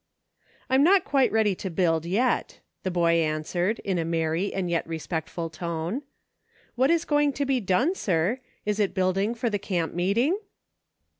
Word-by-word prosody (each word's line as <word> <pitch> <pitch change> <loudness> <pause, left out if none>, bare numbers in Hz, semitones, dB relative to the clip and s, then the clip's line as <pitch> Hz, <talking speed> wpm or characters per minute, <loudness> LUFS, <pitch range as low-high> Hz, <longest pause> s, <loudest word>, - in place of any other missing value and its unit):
" - - -35
I'm 265 +1 +5
not 380 +4 +5
quite 270 -3 +2
ready 220 -2 +3
to 190 +1 -5
build 165 -2 +1
yet," 235 +8 0 0.2
the 185 - -2
boy 170 -2 +2
answered, 165 +7 -1
in 190 -3 -1
a - - 0
merry, 165 +3 -1
and 190 -2 -2
yet 170 -1 -1
respectful 165 +1 -4
tone. 170 - -3 0.7
"What 260 +2 +2
is 335 0 +2
going 295 -1 +2
to 280 +2 -1
be 265 -1 +1
done, 240 - +2
sir.' 190 - 0 0.3
Is 210 0 -1
it 205 -2 +1
building 195 +4 +1
for 235 -1 -1
the 205 - -1
camp 175 -5 -2
meeting 230 - +1
190 Hz, 170 wpm, -26 LUFS, 170-245 Hz, 0.7 s, I'm